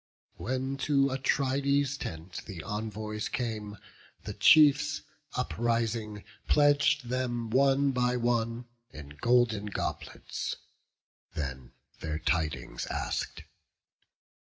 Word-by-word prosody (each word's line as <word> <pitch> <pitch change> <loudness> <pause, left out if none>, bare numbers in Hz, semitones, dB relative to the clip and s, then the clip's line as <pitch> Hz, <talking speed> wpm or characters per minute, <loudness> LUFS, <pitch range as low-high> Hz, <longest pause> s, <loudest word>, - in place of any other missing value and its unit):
When 130 +2 -2
to 140 -1 +2
Atrides' 140 +1 +1
tent 85 - -6
the 90 -6 -7
envoys 105 0 -4
came, 110 -4 -3 0.5
The - - -5
chiefs, 150 0 +5 0.3
uprising, 115 -3 -1 0.2
pledg'd 145 -2 +4
them 120 -2 -2
one 135 +2 +4
by 125 -1 +1
one 120 0 0 0.2
In 75 -9 -10
golden 110 +6 +2
goblets; 100 - -4 0.8
then 65 -4 -5 0.3
their 75 -1 -3
tidings 75 -7 -1
ask'd. - - -3
120 Hz, 90 wpm, -30 LUFS, 105-135 Hz, 0.8 s, chiefs